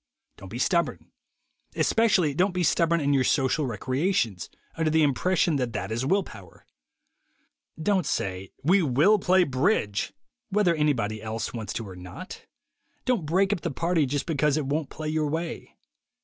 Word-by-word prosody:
Don't 95 Hz, -, -11 dB
be 115 Hz, -, -6 dB
stubborn. 170 Hz, +6 st, 0 dB, 0.6 s
Especially 195 Hz, -10 st, +2 dB
don't 180 Hz, +5 st, +1 dB
be 180 Hz, -, +1 dB
stubborn 170 Hz, +1 st, +2 dB
in 145 Hz, -1 st, +1 dB
your 135 Hz, -2 st, +3 dB
social 135 Hz, +2 st, +1 dB
recreations, 130 Hz, -, -1 dB, 0.2 s
under 160 Hz, -1 st, 0 dB
the 160 Hz, 0 st, +3 dB
impression 160 Hz, +3 st, +2 dB
that 125 Hz, -3 st, -2 dB
that -, -, -4 dB
is 115 Hz, +3 st, -1 dB
will 195 Hz, +4 st, +2 dB
power. 100 Hz, -, -14 dB, 1.1 s
Don't 190 Hz, +3 st, +1 dB
say, 95 Hz, 0 st, -2 dB
"We 185 Hz, +7 st, +4 dB
will 160 Hz, +9 st, +4 dB
play 185 Hz, 0 st, +4 dB
bridge," 130 Hz, -, 0 dB, 0.4 s
whether 200 Hz, -4 st, +2 dB
anybody 120 Hz, -9 st, 0 dB
else 110 Hz, 0 st, -4 dB
wants 110 Hz, -3 st, -5 dB
to 115 Hz, -, -5 dB
or 95 Hz, -, -9 dB
not. 90 Hz, 0 st, -10 dB, 0.6 s
Don't 240 Hz, -12 st, 0 dB
"break 190 Hz, +5 st, +2 dB
up 185 Hz, -, -4 dB
the 170 Hz, -, -2 dB
party" 165 Hz, +1 st, 0 dB
just 145 Hz, +2 st, -2 dB
because 150 Hz, -2 st, +1 dB
it 150 Hz, -, -1 dB
won't 145 Hz, +2 st, -2 dB
play 155 Hz, 0 st, -6 dB
your 155 Hz, -1 st, 0 dB
way. 165 Hz, +3 st, -4 dB
150 Hz, 165 wpm, -26 LUFS, 125-180 Hz, 1.1 s, We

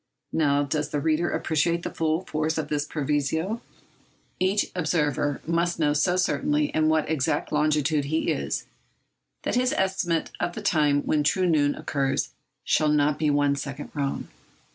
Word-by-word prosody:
Now, 145 Hz, -2 st, +2 dB
does 150 Hz, +1 st, -2 dB
the 145 Hz, -, -1 dB
reader 160 Hz, +3 st, +1 dB
appreciate 170 Hz, +2 st, 0 dB
the -, -, -4 dB
full 160 Hz, +1 st, 0 dB
force 155 Hz, -2 st, -2 dB
of 155 Hz, -2 st, -2 dB
this 150 Hz, -1 st, 0 dB
proviso? 155 Hz, -, -1 dB, 0.8 s
Each 190 Hz, +3 st, +2 dB
observer 150 Hz, -5 st, 0 dB
must 170 Hz, +1 st, 0 dB
know 150 Hz, -3 st, +2 dB
so 175 Hz, +5 st, +2 dB
certainly 295 Hz, +11 st, +1 dB
in 155 Hz, 0 st, +3 dB
what 155 Hz, -1 st, +2 dB
exact 150 Hz, -4 st, 0 dB
longitude 150 Hz, -1 st, +2 dB
he 160 Hz, +3 st, 0 dB
is, -, -, -2 dB, 0.8 s
that -, -, -1 dB
his 250 Hz, +1 st, +2 dB
estimate 185 Hz, -3 st, 0 dB
of 175 Hz, -, -1 dB
the 215 Hz, -, -6 dB
time 150 Hz, -6 st, +2 dB
when 150 Hz, -, +1 dB
true 185 Hz, +5 st, +2 dB
noon 145 Hz, -4 st, +2 dB
occurs 135 Hz, -2 st, -1 dB, 0.3 s
shall 155 Hz, -, +2 dB
not 150 Hz, 0 st, +2 dB
be 155 Hz, -1 st, +2 dB
one 145 Hz, -1 st, +2 dB
second 140 Hz, 0 st, -6 dB
wrong! 140 Hz, -2 st, -2 dB
155 Hz, 160 wpm, -25 LUFS, 145-170 Hz, 0.8 s, in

